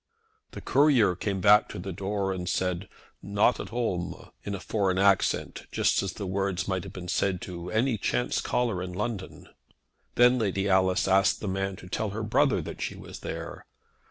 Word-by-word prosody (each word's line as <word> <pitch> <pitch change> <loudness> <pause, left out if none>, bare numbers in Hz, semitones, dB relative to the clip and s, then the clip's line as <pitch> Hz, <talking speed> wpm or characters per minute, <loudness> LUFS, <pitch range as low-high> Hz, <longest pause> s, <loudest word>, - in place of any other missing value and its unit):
The - - -7
courier 130 -10 +4
came 95 0 -3
to 105 +1 +5
the 95 +2 -5
door 100 +1 -2
and 90 -2 -4
said 90 +1 -1 0.3
"not 100 +4 +2
at - - -6
home," 105 -8 -3
in 100 - -3
a - - -6
foreign 95 -2 0
accent, 100 0 +1
just - - +2
as 95 -1 -3
the 100 - -6
words 95 -1 -1
might 95 -2 -1
have - - -8
been 90 -1 -7
said 95 0 0
to 90 -1 -7
any 115 +1 +1
chance 60 -7 0
caller 115 -7 0
in 90 0 -5
London. 105 0 -5 0.7
Then 125 +1 +5
Lady 100 -2 0
Alice 95 -1 +3
asked 95 +1 +3
the 105 - -5
man 95 0 -2
to 90 - -12
tell 105 +4 -2
her 105 +3 -4
brother 110 - +2
that - - -8
she - - -3
was - - -10
there. - - -7
95 Hz, 185 wpm, -27 LUFS, 95-105 Hz, 0.7 s, to